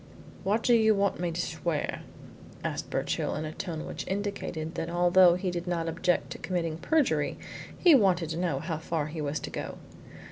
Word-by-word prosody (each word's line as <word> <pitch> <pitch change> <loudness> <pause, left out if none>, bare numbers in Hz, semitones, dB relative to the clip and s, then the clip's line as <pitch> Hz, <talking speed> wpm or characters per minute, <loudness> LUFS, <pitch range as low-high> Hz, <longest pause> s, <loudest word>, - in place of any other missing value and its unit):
"What 210 +4 +1
do 245 - +4
you 220 -2 +5
want 200 0 +1
me 175 -1 -1
to 165 - -4
swear?" 160 -2 -2 0.6
asked - - -3
Birchill, - - -1
in 155 - -3
a 155 - -4
tone 165 -2 -5
which - - -6
indicated 190 -5 -3
that 165 -1 -3
although 175 +1 +5
he 180 0 -2
did 175 0 -4
not 170 -2 -1
object 175 +2 0
to - - -6
committing 165 -4 -2
perjury, 170 - +1 0.4
he 350 -3 +6
wanted 185 - +4
to 160 - -3
know 170 -5 0
how 165 -4 -3
far 160 -2 -2
he 155 0 -5
was 145 0 -2
to - - -6
go. - - -5
175 Hz, 190 wpm, -29 LUFS, 160-190 Hz, 0.6 s, he